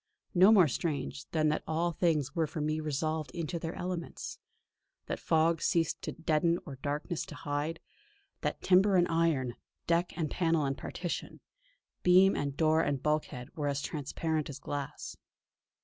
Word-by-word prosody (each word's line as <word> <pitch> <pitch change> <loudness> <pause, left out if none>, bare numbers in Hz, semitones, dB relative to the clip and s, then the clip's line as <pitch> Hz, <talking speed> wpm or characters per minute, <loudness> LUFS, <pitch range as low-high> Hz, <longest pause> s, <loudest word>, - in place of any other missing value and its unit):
No 190 +3 +7
more 190 -7 +7
strange, 140 -1 -3
than 155 -1 +2
that 150 - 0
all 165 +2 +1
things 155 -4 +1
were 165 -3 +1
for 155 - -6
me 155 +1 0
resolved 155 0 -2
into 170 +1 -3
their 165 +1 -4
elements; 180 -2 -5 0.7
that - - -3
fog 165 0 +2
ceased 165 -2 +1
to - - -4
deaden 165 +1 +1
or 140 -4 -8
darkness 150 +4 -3
to - - -8
hide; 155 +1 -3 0.6
that - - -2
timber 190 +2 +5
and 175 -1 +4
iron, 160 -7 +1 0.3
deck 170 +1 +1
and 160 -3 -1
panel 165 -4 +2
and 135 0 -1
partition, 175 +4 -5 0.6
beam 185 +2 +6
and 140 -1 -2
door 160 0 +4
and 140 -4 -1
bulkhead 150 -5 -2
were 150 -2 -2
as 140 0 -1
transparent 155 +1 -2
as 140 - -6
glass. 145 -2 -5
160 Hz, 160 wpm, -31 LUFS, 145-170 Hz, 0.7 s, No